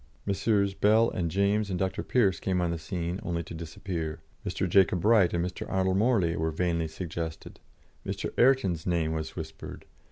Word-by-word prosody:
Messrs. 100 0 +1
Bell 110 +4 +4
and 85 -2 -1
James 100 +3 +1
and 90 - -1
Dr. 95 +1 -1
Pearce 100 -9 +2
came 95 -1 0
on 90 -1 0
the 85 - -3
scene 85 +3 -3
only 85 -1 -2
to 80 - -10
disappear. 80 0 -5 0.2
Mr. 95 - -2
Jacob 90 -1 +4
Bright 105 -3 +5
and 85 0 0
Mr. 90 - -6
Arnold 95 0 +1
Morley 100 -7 +2
were 80 +1 0
vainly 85 0 0
suggested. 80 -1 -6 0.4
Mr. - - -4
Ayrton's 120 -11 +3
name 85 -3 +1
was 80 -1 -4
whispered. - - -8
90 Hz, 170 wpm, -28 LUFS, 85-100 Hz, 0.4 s, Bright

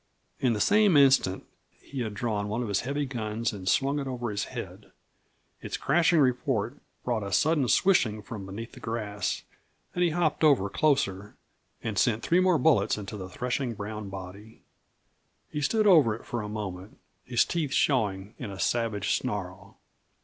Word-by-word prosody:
In 125 -3 +2
the 105 - -2
same 205 - +4
instant 135 -9 +4 0.3
he 140 - -8
had 110 -4 -3
drawn 105 -2 -2
one 110 +4 -2
of 115 - -4
his 100 -2 +1
heavy 140 +3 -2
guns 115 -3 -3
and 95 -2 -3
swung 140 +5 +2
it 140 - -4
over 120 -3 -3
his 105 0 -2
head. - - -8 0.7
Its - - -4
crashing 165 +4 +3
report 125 -2 +1 0.3
brought 120 -3 -1
a 100 -1 -5
sudden 150 - +2
swishing 110 - +3
from 105 -5 -7
beneath 110 +4 -7
the - - -13
grass, 105 -3 -3 0.5
and 180 - +1
he 175 - +3
hopped 160 -1 0
over 130 -10 +4
closer 105 -10 0 0.5
and 105 -3 -1
sent 115 -1 +2
three 175 - +3
more 185 -2 +4
bullets 155 -6 +3
into 105 0 -6
the 95 -2 -7
threshing 125 +3 -2
brown 105 0 -6
body. 95 +3 -10 0.9
He 150 - -3
stood 215 +9 +2
over 155 - +6
it 115 - -13
for 120 - -3
a 105 - -6
moment, 100 -2 -6 0.3
his 120 -1 +2
teeth 160 -5 -2
showing 105 -8 +1
in 120 - -5
a 95 -1 -8
savage 115 -4 0
snarl. - - -4
115 Hz, 170 wpm, -28 LUFS, 105-140 Hz, 0.9 s, over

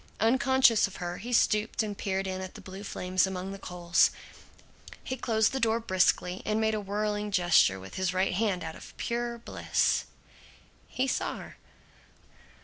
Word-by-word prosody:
Unconscious 260 0 +4
of 195 - -12
her, 175 -1 -4
he 240 +5 -6
stooped 220 -2 +2
and 210 -1 -4
peered 195 -1 -2
in 190 0 -3
at 185 0 -7
the - - -9
blue 190 +1 -9
flames 185 -1 0
among 190 0 -4
the 195 - -7
coals. 175 -2 +2 0.9
He 260 - -3
closed 220 -4 +1
the 270 - -2
door 230 -1 +2
briskly, 185 -3 +1
and 215 0 0
made 220 0 +1
a 215 - -1
whirling 210 +1 -2
gesture 175 - +4
with 95 0 -10
his 185 -1 +1
right 185 0 +1
hand, 195 -2 0
out 160 0 -5
of - - -13
pure 235 0 -2
bliss. 235 - 0 0.8
He 260 - -1
saw - - -1
her. - - -11
200 Hz, 170 wpm, -29 LUFS, 185-225 Hz, 0.9 s, Unconscious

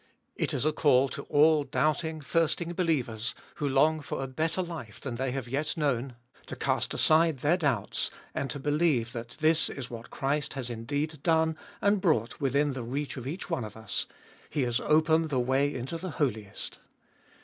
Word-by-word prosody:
It - - -1
is - - -1
a 155 - +4
call 135 -3 +4
to 140 - -5
all 150 +1 +5
doubting, 155 +3 0
thirsting 165 +3 0
believers, 130 - 0 0.2
who 145 - 0
long 155 +4 +4
for 140 -2 -4
a - - -3
better 160 +7 -1
life 160 -11 -7
than 130 - -5
they 130 +3 -1
have 130 -2 -3
yet 145 +6 -2
known, 135 -4 0 0.3
to - - -5
cast - - 0
aside 160 -1 +4
their 155 +4 +4
doubts, 140 - 0 0.2
and 140 - -2
to 125 - -3
believe 145 -4 +1
that 120 0 -7
this 160 +1 +4
is 130 -3 -6
what 115 -1 -8
Christ 140 +2 -1
has 130 -3 -4
indeed 145 +6 -3
done 160 0 +3 0.3
and 200 -1 +3
brought 125 - +1
within 140 +1 +2
the 130 - -4
reach 135 +5 -3
of 130 -2 -6
each 165 +7 -4
one 165 -8 -1
of 105 0 -8
us: 110 -3 -3 0.4
He 145 - 0
has 120 -1 +1
opened 160 +1 +3
the 135 -3 +1
way 135 +3 +2
into 135 +5 -4
the 185 - -4
Holiest 110 - -3
145 Hz, 185 wpm, -29 LUFS, 125-160 Hz, 0.4 s, all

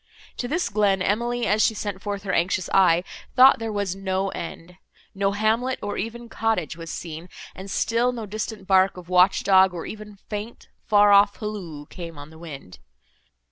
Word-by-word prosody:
To 245 - -3
this 325 +7 -1
glen, 200 -2 +2
Emily, 235 +4 0
as 210 +2 +2
she 220 - +3
sent 205 -2 -5
forth 200 -1 -4
her 190 -2 -2
anxious 180 +1 0
eye, 180 -3 +5 0.3
thought 260 0 +7
there 225 -1 -3
was 200 -3 -2
no 195 0 -1
end; 175 0 -8 0.4
no 195 0 0
hamlet, 225 +5 +1
or 205 - -3
even 235 +3 -5
cottage, 220 -10 -1
was 165 -1 -9
seen, 165 +1 -7 0.2
and 190 +1 -9
still 230 +5 +1
no 235 -3 -6
distant 215 0 -5
bark 190 0 +3
of 180 -1 -11
watch 180 +1 +4
dog, 190 -2 +5
or 170 - -5
even 210 -1 -9
faint, 210 +2 -7 0.2
far 205 -1 +5
off 200 0 +6
halloo 185 -9 -6
came 165 -1 -9
on 145 +2 -10
the 160 - -14
wind. 140 - -10
200 Hz, 180 wpm, -24 LUFS, 180-215 Hz, 0.4 s, thought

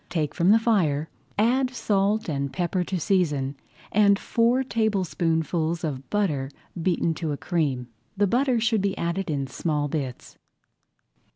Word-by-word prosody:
Take 155 -4 -1
from 175 +1 +2
the 215 - +7
fire, 170 -10 +1 0.3
add 250 +5 +3
salt 215 -3 0
and 140 -3 -2
pepper 180 0 -1
to 185 0 -2
season, 150 -7 +1 0.4
and 200 -1 +5
four 235 +5 +2
tablespoonfuls 170 - 0
of 135 -4 -4
butter 155 -11 0 0.3
beaten 170 -1 +1
to 160 -1 -3
a - - -4
cream. 140 -9 -1 0.3
The 205 - +4
butter 250 +4 +2
should 220 -2 +2
be 195 -1 -1
added 170 +2 -2
in 140 -3 -1
small 145 +2 -1
bits. 135 -4 -5
175 Hz, 145 wpm, -25 LUFS, 150-210 Hz, 0.4 s, the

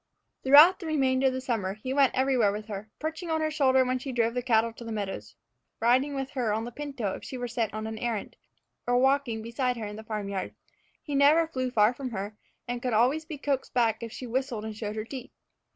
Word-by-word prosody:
Throughout 300 +8 +8
the 340 - -6
remainder 265 -3 +2
of 260 - +1
the 260 - -3
summer 220 -7 -2
he 255 +5 -4
went 275 -2 +3
everywhere 255 -5 +3
with 210 +1 -5
her, 205 +1 -6
perching 320 +3 -4
on 320 0 +1
her 310 0 0
shoulder 265 -3 +3
when 255 0 0
she 265 +1 -5
drove 230 -2 +1
the 250 - -1
cattle 230 -2 +2
to 235 - -11
the 230 - -6
meadows, 195 - -5 0.4
riding 255 +5 +3
with 270 0 -3
her 245 -6 -1
on 220 +2 -1
the 240 - -6
pinto 260 -7 -4
if - - -8
she 260 - -6
were 245 0 -3
sent 230 -2 -1
on 215 0 -4
an 220 0 -5
errand, 230 -3 -3 0.5
or 245 0 +3
walking 265 -4 +2
beside 245 +2 -1
her 220 - -4
in 210 0 -7
the 220 - -8
farm 215 -2 -4
yard. 195 -2 -4 0.5
He 295 - -5
never 290 +4 +5
flew 255 -5 -3
far 220 -1 +4
from 260 0 -5
her, 205 -1 -5 0.3
and 245 0 -3
could 250 -2 -1
always 260 +8 +2
be 310 -2 -6
coaxed 275 -2 -2
back 230 -2 +2
if 230 -1 -6
she 255 - -7
whistled 245 -2 -2
and 220 -1 -5
showed 210 -1 -4
her 215 0 -3
teeth. 260 +1 -8
245 Hz, 240 wpm, -28 LUFS, 220-270 Hz, 0.5 s, Throughout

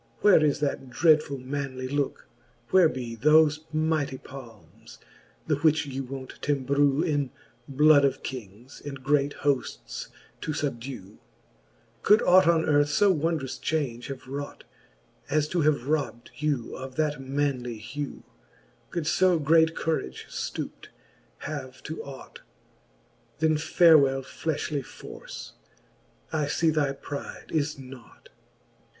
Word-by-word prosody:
Where 195 -7 +6
is 145 -1 +1
that 140 -2 -2
dreadfuU 145 -2 +2
manly 130 -2 -3
looke? 140 +1 -2 0.4
where 185 -4 +6
be 120 -4 -5
Thole 150 +5 +5 0.2
mighty 155 -3 0
palmes, 120 -7 -13 0.5
the 150 -3 +1
which 155 +1 +3
ye 135 -1 -4
wont 130 0 -8
t'embrew 140 +1 +2
In 145 -5 0 0.4
bloud 145 +1 +5
of 140 - +1
kings, 120 0 -8
and 140 -2 -7
great 140 +1 +2
hoaftes 140 -3 -2 0.3
to 155 - -2
fubdew? 125 -8 -5 0.8
Could 210 +2 +5
ought 185 -1 +6
on 165 -1 +4
earth 145 -1 +3
io 205 -1 +6
wondrous 160 -5 -1
chaunge 130 -7 -2
have 135 -2 -7
wrought^ 140 +2 -6 0.7
As 150 +1 +2
to 175 - +1
have 150 -3 +3
robde 145 -6 -2
you 145 -6 -2
of 130 0 -8
that 150 -2 0
manly 135 -3 -2
hew? 135 +6 -6 0.7
Could 170 -3 -3
fo 180 +1 +4
great 160 +2 +4
courage 110 - -2
ftouped - - -5 0.6
have 130 0 -6
to 155 - -6
ought? 140 -1 -10 1.0
Then 155 +1 +2
farewell 150 -4 +5
flelhly 150 0 -3
force - - -10 0.8
j 160 - -1
I 145 - 0
fee 160 +2 +2
thy 150 -3 +1
pride 140 +1 -8
is 150 -2 0
nought. 130 -2 -13
145 Hz, 130 wpm, -27 LUFS, 130-155 Hz, 1.0 s, Where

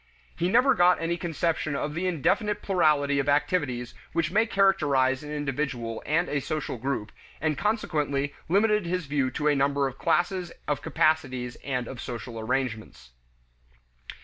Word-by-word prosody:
He 175 +1 0
never 250 +6 +5
got 180 -3 +4
any 165 +1 -1
conception 165 -3 -1
of 150 +1 -2
the 175 +4 -1
indefinite 195 - 0
plurality 150 -7 +2
of 140 +1 0
activities 140 -5 0 0.2
which 165 -1 0
may 220 +4 +3
characterize 145 -10 +2
an 150 0 -8
individual 140 -5 -3
and 170 +4 +2
a 145 - 0
social 140 -3 -4
group, 120 -4 -3 0.3
and 155 -1 0
consequently 150 -9 -1 0.2
limited 210 +1 +3
his 180 -1 -1
view 140 -2 0
to 150 - -5
a 150 - +4
limited 145 -2 +2
number 140 0 +2
of 135 0 -8
classes 175 +1 0 0.2
of 150 -1 -1
capacities 130 -6 0
and 125 -3 -3
of 130 - -7
social 120 -1 -6
arrangements. 110 - -3
150 Hz, 155 wpm, -27 LUFS, 135-175 Hz, 0.3 s, never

